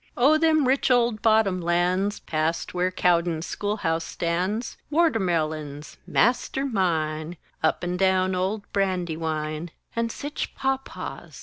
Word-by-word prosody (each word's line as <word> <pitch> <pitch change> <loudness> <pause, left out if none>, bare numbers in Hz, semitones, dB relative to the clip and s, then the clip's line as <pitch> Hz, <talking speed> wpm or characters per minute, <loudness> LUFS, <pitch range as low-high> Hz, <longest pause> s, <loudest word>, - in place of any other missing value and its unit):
O 275 +6 +5
them 310 -4 +3
rich 265 +1 +2
old 235 -4 +3
bottom 215 -5 +3
lands, 180 +4 +1
Past 155 +1 -1
where 180 0 +1
Cowden's 170 -2 +1
Schoolhouse 195 -6 -1
stands! 180 +9 -2 0.2
Wortermelons 160 - 0
master 250 +3 +1
mine! 165 - -1 0.2
Up 160 - +1
and 180 0 -2
down 190 -1 +3
old 190 +3 -1
Brandywine! 165 -4 -1 0.3
And 230 0 0
sich 290 +5 -5
pop 270 0 -1
paws! - - -8
185 Hz, 120 wpm, -25 LUFS, 165-225 Hz, 0.3 s, O